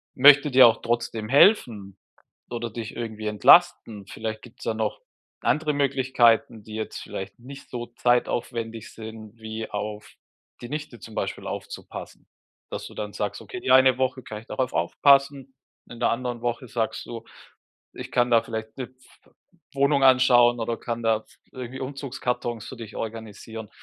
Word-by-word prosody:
möchte 145 +2 +7
dir 130 -1 +9
auch 115 - +1
trotzdem 115 -2 -2
helfen 115 - +4 0.5
oder 120 -1 -3
dich 110 -1 -7
irgendwie 110 -2 -5
entlasten. 110 - +4
Vielleicht 110 +1 -5
gibt's 120 0 -14
da 110 - 0
noch 110 - -2 0.4
andere 150 -1 +1
Möglichkeiten, 130 -5 +2
die 110 0 -9
jetzt 110 0 -5
vielleicht 95 +3 -7
nicht 135 +3 -11
so 120 -1 -5
zeitaufwendig 120 -2 -1
sind, 110 0 -10
wie 110 0 -6
auf 105 0 -5 0.5
die 120 - -8
Nichte 150 +2 -6
zum - - -12
Beispiel - - -3
aufzupassen.” - - -8 0.4
Dass - - -5
du - - -13
dann - - -5
sagst: - - -3
„Okay, 370 - -8
die - - 0
eine 130 -1 +6
Woche 130 -1 -1
kann 105 - -7
ich 115 - -21
darauf 130 -2 -2
aufpassen,” 140 - +3 0.4
in 120 - -10
der - - +2
anderen 120 0 -3
Woche 120 +1 -3
sagst 115 -1 -3
du: 115 -1 -8 0.7
„Ich - - -8
kann 120 -1 +2
da 115 -1 +6
vielleicht 110 -1 -6
'ne 130 -3 -4
pf 130 0 -25 0.4
Wohnung 140 0 +2
anschauen 125 -2 +5
oder 115 0 -2
kann 120 0 -5
da 110 -1 +2
pf - - -25 0.2
irgendwie 130 0 -7
Umzugskartons 125 -4 -4
für 130 - -9
dich 115 -2 -9
organisieren.” 110 -1 -7
120 Hz, 160 wpm, -25 LUFS, 110-130 Hz, 0.7 s, dir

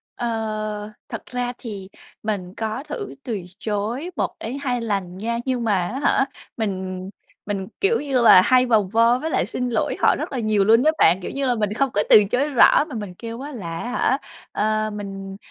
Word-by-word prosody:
Ờ, 215 -2 -3 0.2
thật - - -6
ra 245 0 -3
thì 200 -6 -7 0.3
mình 195 -4 -3
có 220 +4 -3
thử 305 +7 -6
từ 225 -6 -3 0.2
chối 220 - -2
1 - - -2
đến 240 +5 -5
2 250 -3 -1
lần 195 -5 -2
nha, 230 +4 -2
nhưng 255 -3 -1
mà 220 -2 +2
á 260 - -4
hả, 270 - +3 0.3
mình 190 -3 -3 0.4
mình, 195 -2 -3
kiểu 425 +4 +3
như 270 -4 +1
là, 225 -5 +9
hay 255 +5 +4
vòng 215 -6 +2
vo 230 +3 +4
với 320 - -3
lại - - +1
xin 250 0 -3
lỗi 225 -3 0
họ - - +4
rất - - -5
là 265 - -2
nhiều 215 -3 +2
luôn 225 +4 +5
á 310 - +5
bạn, 180 - +5
kiểu - - -5
như 275 0 -2
là 245 - +2
mình 210 -2 -1
không 275 +4 +1
có 205 - +2
từ 210 - +9
chối 270 +4 +1
rõ 285 +2 +5
mà 295 -6 -8
mình 205 -4 -5
kêu 230 +5 -7
á 290 +2 -6
là, 170 - -6
á 240 - -4
hả, 265 - +2 0.3
ờ, 215 0 0
mình, 195 -1 -7
225 Hz, 215 wpm, -22 LUFS, 205-250 Hz, 0.4 s, là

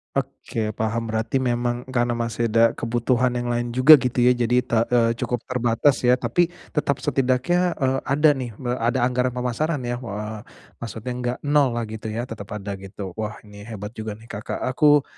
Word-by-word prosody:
Oke, 110 -2 -3
paham, 110 +1 -2
berarti 115 +4 0
memang 120 0 -1
karena 120 -1 +1
masih 115 0 -1
ada 115 +1 +4
kebutuhan 120 +1 0
yang 120 0 -1
lain 120 0 -1
juga 135 +3 +9
gitu 125 -1 0
ya, 125 - +6
jadi 125 0 +2
te 120 -3 +1
eee, 115 -2 +3
cukup 125 -2 -2
terbatas 125 +2 +1
ya. 125 - +6
Tapi, 125 +8 +1 0.2
tetap, 140 -2 -1
setidaknya, 135 +8 +1
eee, 135 -1 0
ada 150 +2 +4
nih 125 -6 -4
me 125 0 -3
ada 120 +1 +1
anggaran 125 0 +1
pemasaran 125 +4 -1
ya, 120 0 -3
eee, 105 -2 -5 0.4
maksudnya 115 +1 -6
nggak 125 0 -2
nollah 140 -5 +2
gitu 110 0 -7
ya, 110 +2 -3
tetap 115 -5 -8
ada 100 -1 -5
gitu. 95 0 -7
Wah, 105 -1 -3
ini 105 -1 -13
hebat 105 -2 -6
juga 110 -2 -6
nih 115 +2 -13
Kakak, 105 +3 -5
aku, 145 +2 +4
120 Hz, 180 wpm, -23 LUFS, 115-130 Hz, 0.4 s, juga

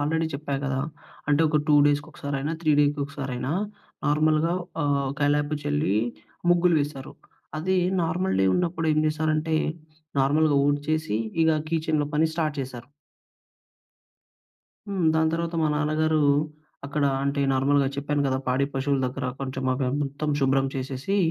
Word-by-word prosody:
Already 160 +3 0
చెప్పా 140 0 -3
గదా! 135 0 -1 0.5
అంటే, 145 +2 +3
ఒక 150 - +1
2 150 - +5
డేస్‌కొ 145 0 0
కసారైనా, 140 +2 -3
3 155 -2 +2
డేకొకసారైనా 140 -2 -1 0.5
నార్మల్‌గా 155 +3 +2 0.3
ఆహ్, 140 -2 +1
కల్లాపు 145 +1 +1
చల్లి, 145 -8 +1 0.5
ముగ్గులు 175 -1 +4
వేశారు. 145 -1 -5 0.5
అది 185 +4 0 0.3
నార్మల్ 180 +4 0
డే 95 - +4
ఉన్నప్పుడు 170 -2 0
ఏం 155 - +1
జేసారంటే, 155 +1 0 0.6
నార్మల్‌గా 145 +2 +3
ఊడ్చేసి, 145 -3 0 0.3
ఇగ 160 - +4 0.2
కీచెన్‌లో 155 -2 0
పని 160 +2 +3
స్టార్ట్ 155 -3 -1
చేశారు. 130 -1 -7 2.0
హ్మ్. 195 -3 -1
దాని 160 0 +3
తర్వాత, 170 +1 -2
మా 155 - +2
నాన్నగారు 155 +1 +1 0.6
అక్కడ 145 0 -1 0.2
అంటే, 140 0 0
నార్మల్‌గా 135 +1 +2
చెప్పాను 145 +1 -1
గదా 130 -1 0
పాడి 130 +2 +2
పశువుల 135 +1 0
దగ్గర 130 +1 -4
కొంచెం 130 0 -4
అవి 130 0 -1
మొత్తం 145 +2 -3
షుభ్రం 135 0 +2
చేసేసి 135 +8 -2
145 Hz, 130 wpm, -25 LUFS, 140-155 Hz, 2.0 s, 2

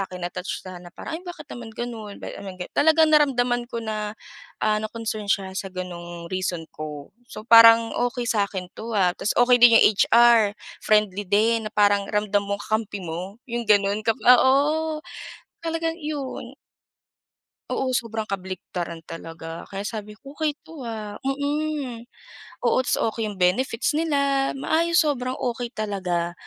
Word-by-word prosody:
akin, 180 -1 -7
na-touch 180 +1 -5
siya 185 -1 -8
na 175 - -11
parang, - - -7
"Ay - - -18
bakit 350 -4 -9
naman 240 -2 -8
gano'n." 225 -4 -6
Ba't - - -7
naman 190 -2 -8
gan 180 - -7
Talagang 315 +1 +4
naramdaman 245 -5 +3
ko 235 -2 -4
na, 215 0 -4 0.5
ah, 215 0 +2
na 215 - -3
concern 220 -2 -5
siya 195 -2 0
sa 195 +1 -4
gano'ng 175 -2 -7
reason 180 -3 -2
ko. 150 -2 -8 0.2
So - - -8
parang 230 0 +8
okey 245 0 -1
sa 205 -3 +1
akin 185 -2 -6
'to 230 +1 -7
ha, 180 -2 +3
tapos 210 - -2
okey 245 0 +6
din 240 -1 +8
yung - - +6
HR, 230 -3 +5 0.3
friendly 210 -2 +2
din 220 +3 +2
na 215 - -26
parang 205 -1 +3
ramdam 210 -1 +1
mong 200 0 -3
kakampi 215 -2 -2
mo, 175 +5 -6
yung 235 0 -2
gano'n 205 0 +3
ka 225 - +3
oo, 295 +5 +4 0.6
talagang 330 0 -2
'yon. 295 -3 -5 1.1
Oo, 260 -1 -1
sobrang 225 -3 -2
kabaliktaran 180 -3 -5
talaga. 165 0 -8
Kaya 195 +1 -5
sabi 210 -1 -6
ko 275 +5 -13
okey 305 -2 -1
'to 320 -2 -11
ah. 215 -2 -6
Mm. 285 -3 -2 0.6
Oo, 240 - +3
tapos - - +1 0.2
okey 225 -2 -2
yung 200 - -9
benefits 230 +9 +1
nila, 280 -4 +1
maayos 335 +5 +2
sobrang 255 -4 -1
okey 245 -1 -3
talaga. 180 -5 -2
220 Hz, 160 wpm, -24 LUFS, 195-255 Hz, 1.1 s, parang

